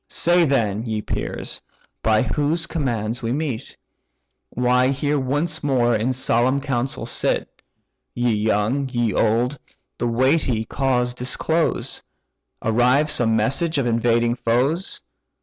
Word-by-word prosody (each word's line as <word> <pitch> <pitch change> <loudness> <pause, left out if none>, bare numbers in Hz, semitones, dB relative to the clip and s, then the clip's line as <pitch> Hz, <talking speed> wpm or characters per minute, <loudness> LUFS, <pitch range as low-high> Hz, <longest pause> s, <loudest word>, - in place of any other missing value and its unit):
Say 175 0 +3
then, 110 -7 0
ye 110 -1 -2
peers! - - -4 0.4
by 110 +1 +3
whose 155 +5 0
commands 120 -8 -2
we 115 -1 -2
meet? 140 -4 -3 0.7
Why 125 +1 +2
here 140 +2 0
once 145 +5 -1
more 125 -4 +2
in 110 +4 0
solemn 130 +1 +1
council 135 -2 -2
sit? 120 - -2 0.5
Ye 120 -1 +1
young, 110 +6 0
ye 120 -4 0
old, 120 +7 +1 0.4
the 120 - 0
weighty 125 -1 +1
cause 125 -1 0
disclose: 155 +6 -1 0.6
Arrives 125 +7 +3
some 115 -6 +2
message 140 +9 +1
of 135 - +1
invading 115 0 +2
foes? 125 +9 -1
125 Hz, 120 wpm, -22 LUFS, 115-140 Hz, 0.7 s, Say